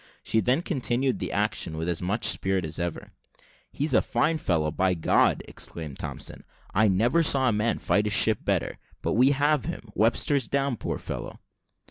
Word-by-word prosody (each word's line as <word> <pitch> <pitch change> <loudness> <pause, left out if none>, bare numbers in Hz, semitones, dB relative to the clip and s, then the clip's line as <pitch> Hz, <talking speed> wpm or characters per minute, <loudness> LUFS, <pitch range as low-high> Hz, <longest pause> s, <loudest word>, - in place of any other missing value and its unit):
She 110 - +1
then 125 - +1
continued 130 -5 -1
the - - -4
action 80 - -1
with 80 +1 -3
as 85 -2 -1
much 100 +5 -1
spirit 95 -4 +1
as 80 - -5
ever. 85 -1 -4 0.6
"He's 150 +3 -1
a - - +5
fine 160 0 0
fellow, 80 - 0
by 90 +4 +1
God!" 80 - +2
exclaimed 75 -5 -6
Thompson; - - -6 0.3
"I 110 +2 +3
never 115 - +2
saw 135 -5 +5
a - - 0
man 105 +2 0
fight 100 +5 +1
his 105 - 0
ship 110 -1 +4
better: - - -1 0.2
but - - 0
we 125 +4 +4
have 145 0 +1
him. 145 -9 -7
Webster's 115 +4 +1
down, 140 -3 -1
poor - - -4
fellow!" - - -7
110 Hz, 180 wpm, -26 LUFS, 90-135 Hz, 0.6 s, a